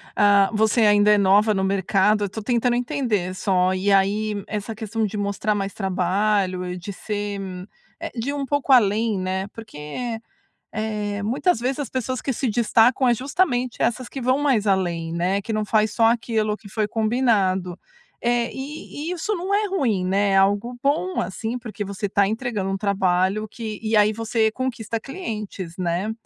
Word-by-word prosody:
ah, 200 -1 +5
você 220 +2 +2
ainda 210 0 +5
é 210 - +6
nova 205 +2 +4
no 190 -1 0
mercado 195 +2 +2
eu - - 0
estou 215 +3 -6
tentando 240 +1 +1
entender 240 - -1
só, 185 -1 +1
e 195 +2 0
aí 205 +1 +1
essa 215 +1 -4
questão 220 +1 -2
de 210 +1 -4
mostrar 205 +1 -1
mais 195 -1 -3
trabalho 190 0 0
e 180 0 -4
de 200 +3 -7
ser, 205 0 -4 0.6
eh, - - -5
de 240 +3 -3
ir - - -1
um 280 -1 -2
pouco 285 0 0
além, 220 -3 +4
né, 190 +1 -2
porque, 225 +3 -6 0.5
eh, 210 -2 -3
muitas 255 - +1
vezes 255 +4 -2
as 285 - -3
pessoas 255 0 -3
que 270 - -1
se 255 +1 -1
destacam 235 +3 +3
é 240 - +5
justamente 255 - -1
essas 240 +1 0
que 270 - -6
vão 255 +2 +2
mais 265 -8 +1
além, 170 -4 0
né, 185 +4 0
que 220 - -4
não 215 0 0
faz 215 0 +2
só 225 +1 +3
aquilo 225 -2 0
que 200 - -14
foi 215 +1 -1
combinado, 215 -6 +1 0.4
eh, 240 0 +1
e 295 +3 -6
e - - -2
isso 360 +5 -2
não 370 +3 -3
é 420 +1 +2
ruim, 240 - 0
né, 195 +2 +2
é 195 - +4
algo 205 +5 +2
bom 320 +6 +1
assim, 220 +6 -4
porque 220 -4 -6
você 200 +1 -4
está 200 0 +2
entregando 220 -3 -2
um 195 - -1
trabalho 195 +1 +1
que 220 -1 -6
e 220 0 0
aí 210 +1 +4
você 225 0 0
conquista 230 -3 -3
clientes, 215 - -6
né, 180 +3 -1
215 Hz, 185 wpm, -23 LUFS, 195-240 Hz, 0.6 s, é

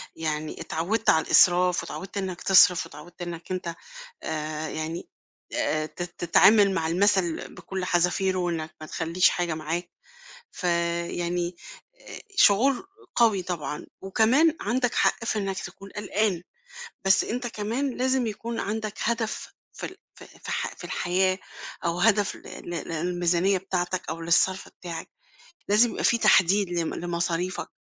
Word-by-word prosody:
يعني 155 -1 -3
اتعوّدت 200 +8 -1
على 160 - +4
الإسراف 180 0 +5
واتعوّدت 190 +4 -7
إنك 185 -2 -3
تصرِف 180 -2 +6
واتعوّدت 170 +5 -13
إنك 175 0 -6
أنت 175 -2 -3 0.5
آآ 155 0 -3
يعني 160 +2 -5 0.5
آآ 155 0 0
ت 175 - -7
تتعامل 195 +4 +4
مع 165 -3 0
المَثَل 185 -1 +1
بكلّ 185 +1 -5
حزافيره 180 +2 +1
وإنك 165 -3 -2
ما 155 - -7
تخلّيش 170 +3 +2
حاجة 175 -2 -1
معاك، 165 +3 -4 0.6
ف - - -10 0.5
يعني 175 0 -2 0.4
آآ - - -10 0.2
شعور 255 - +4 0.3
قوي 220 -5 +4
طبعًا 170 -4 -4 0.2
وكمان 235 - +3
عندك 245 +3 0
حق - - +2
في 225 - 0
إنك 195 -2 -2
تكون 195 +3 -10
قلقان، 205 -3 -1 0.6
بس 190 0 +5
أنت 245 +2 -3
كمان 235 +5 -2
لازم 260 -1 +1
يكون 225 +2 -4
عندك 215 0 -3
هدف 230 -1 -2 0.2
في - - -6
ال - - -10 0.2
في - - -15
ال - - -16
في - - -20
الح - - -2
في - - -10
الحياة 185 +1 +1 0.5
أو 170 +1 0
هدف 205 0 +3
لل - - -10
لل 170 - -4
للميزانية 175 +3 +1
بتاعتك 185 -1 -2
أو 165 +1 -4
للصَرف 170 +3 +2
بتاعك، 170 -2 -8 0.6
لازم 215 +4 +5
يبقى - - -4
فيه 235 - +4
تحديد 195 -2 +4
لم 170 -2 -1
لمصاريفك 175 +1 -2
180 Hz, 145 wpm, -26 LUFS, 170-205 Hz, 0.6 s, تصرِف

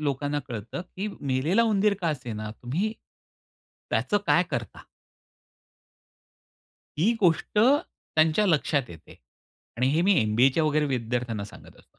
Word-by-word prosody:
लोकांना 145 0 -1
कळतं, 115 - -6
की 185 +3 -6
मेलेला 145 - +1
उंदीर 210 -2 +2
का 170 - 0
असेना, 115 -8 -4
तुम्ही 180 - -1 1.0
त्याचं 205 - +1
काय 175 - +4
करता? 120 - -5 2.1
ही 205 +9 +3
गोष्ट 180 +2 +2
त्यांच्या 210 - +2
लक्षात 150 -4 +2
येते. 80 -1 -13 0.6
आणि 125 +2 +1
हे 165 - +2
मी 200 +3 +4
एम-बी-एच्या 125 +8 +3
वगैरे 150 0 +2
विद्यार्थ्यांना 120 -4 -2
सांगत 100 - -14
असतो. - - -25
150 Hz, 120 wpm, -26 LUFS, 125-185 Hz, 2.1 s, काय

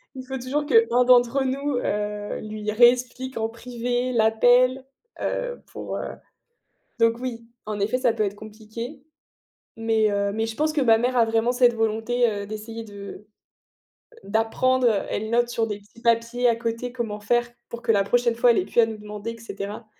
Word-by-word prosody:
il 255 0 -8
faut 265 0 -4
toujours 275 +4 -2
qu'1 320 - +4
d'entre 250 +2 +4
nous, 275 +1 -1
heu, 210 -1 -3
lui 215 0 -4
réexplique 250 +3 +3
en 225 0 -1
privé 245 +1 -3
l'appel, 245 +3 +4 0.4
heu, - - -3
pour, - - -6
heu, - - -4 0.9
donc 230 0 +3
oui 235 -2 -6 0.2
en 210 -1 -4
effet 215 +5 +1
ça 250 -3 +2
peut 220 -2 0
être 200 0 -2
compliqué, 220 +6 -9 0.7
mais 225 -1 +1
heu, 200 0 0
mais 220 +1 -1
je 225 - -5
pense 305 +3 0
que 295 - +1
ma 225 -3 +5
mère 245 +2 0
a 230 - +5
vraiment 225 +2 +1
cette 245 -1 +4
volonté, 225 +2 +1
heu, 200 -1 -4
d'essayer 220 +2 -7
de 205 -1 -10 1.0
d'apprendre, 240 +4 +1 0.2
elle 220 +1 -2
note 240 +1 +2
sur 230 -1 -1
des 210 -2 -5
petits 210 +3 -20
papiers 235 +1 +2
à 230 - +4
côté 230 +1 -3
comment 225 -4 -4
faire 240 +3 +1 0.2
pour 235 +1 -8
que - - -1
la 200 -2 +2
prochaine 240 +1 +1
fois 240 0 +5
elle - - 0
ait - - +1
plus 235 - +2
à 230 - +5
nous 220 -1 -6
demander 210 +1 -7
et 230 - -12
cetera, 205 0 -7
230 Hz, 185 wpm, -24 LUFS, 215-245 Hz, 1.0 s, ma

